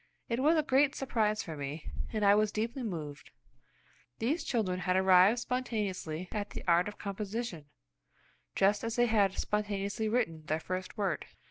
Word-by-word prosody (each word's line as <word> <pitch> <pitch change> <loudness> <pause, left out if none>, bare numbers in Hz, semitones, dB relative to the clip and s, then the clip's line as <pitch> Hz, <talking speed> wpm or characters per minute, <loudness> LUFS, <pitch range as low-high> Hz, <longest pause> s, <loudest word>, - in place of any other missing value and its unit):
It 235 +1 0
was 310 +5 +4
a 310 - +3
great 280 +1 +3
surprise 220 -5 0
for 160 - -6
me, 145 +2 -6 0.2
and 215 -2 0
I 200 - +7
was 210 0 +3
deeply 230 +5 -2
moved. 160 -10 -5 0.9
These 285 +9 0
children 195 -7 -1
had 180 0 0
arrived 190 +3 +6
spontaneously 200 -10 -3
at 205 -1 -3
the - - -7
art 175 +2 +4
of 210 - -7
composition, 200 -3 -4 0.9
just 205 +2 +3
as 230 0 -2
they 240 - +4
had 205 -4 +3
spontaneously 210 +1 -1
written 190 -10 -1
their 155 +1 0
first 185 +3 -5
word. 195 -6 -1
205 Hz, 160 wpm, -31 LUFS, 185-230 Hz, 0.9 s, I